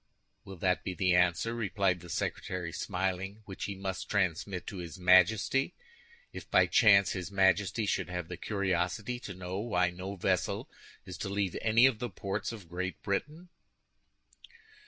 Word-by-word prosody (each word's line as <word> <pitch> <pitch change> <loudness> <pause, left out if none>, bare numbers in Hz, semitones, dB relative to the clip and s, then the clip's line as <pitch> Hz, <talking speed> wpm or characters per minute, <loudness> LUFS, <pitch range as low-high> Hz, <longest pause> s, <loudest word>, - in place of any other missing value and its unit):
"Will 95 - -8
that 90 +1 0
be 95 - -4
the 90 -1 +2
answer," 90 +5 +2
replied 100 -5 0
the 85 0 -12
secretary, 85 +1 -3
smiling, 95 +4 -3
"which 95 -2 -6
he 100 - -4
must 95 -1 -5
transmit 95 -1 -1
to 100 - -6
his 85 +1 -7
Majesty 95 +8 +4 0.6
if, - - -9
by - - +5
chance, 100 -4 +5
his 90 -1 -4
Majesty 100 +2 +2
should 100 - -1
have 90 -2 -4
the - - -6
curiosity 100 +3 -1
to 100 -6 -8
know 90 +1 -5
why 90 -5 +1
no 95 +3 -6
vessel 95 -1 0 0.4
is 90 -2 -8
to 100 - -3
leave 100 -2 -1
any 115 +2 +5
of 130 -5 +3
the 120 - -3
ports 100 +2 -3
of 105 -7 -10
Great 95 +2 -4
Britain?" 150 - -3
95 Hz, 160 wpm, -31 LUFS, 90-105 Hz, 0.6 s, by